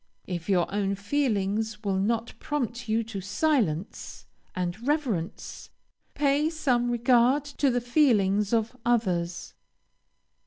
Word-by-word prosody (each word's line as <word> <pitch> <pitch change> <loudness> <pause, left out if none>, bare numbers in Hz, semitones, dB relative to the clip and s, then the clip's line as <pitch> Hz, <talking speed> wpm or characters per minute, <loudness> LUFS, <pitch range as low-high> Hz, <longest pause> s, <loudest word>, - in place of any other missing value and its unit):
If 175 0 -5
your 180 -3 +3
own 200 -1 0
feelings 210 -2 -1
will 195 -2 0
not 230 +3 -1
prompt 240 -5 -3
you 225 +1 +2
to 215 -3 -6
silence 205 - -1 0.3
and 185 +7 -3
reverence, 250 - -2 0.5
pay 290 +2 +2
some 255 -7 0
regard 245 +3 +3
to 285 -1 0
the 245 -1 0
feelings 210 -7 +2
of 230 +1 0
others. 185 -8 0
230 Hz, 115 wpm, -27 LUFS, 195-255 Hz, 0.5 s, your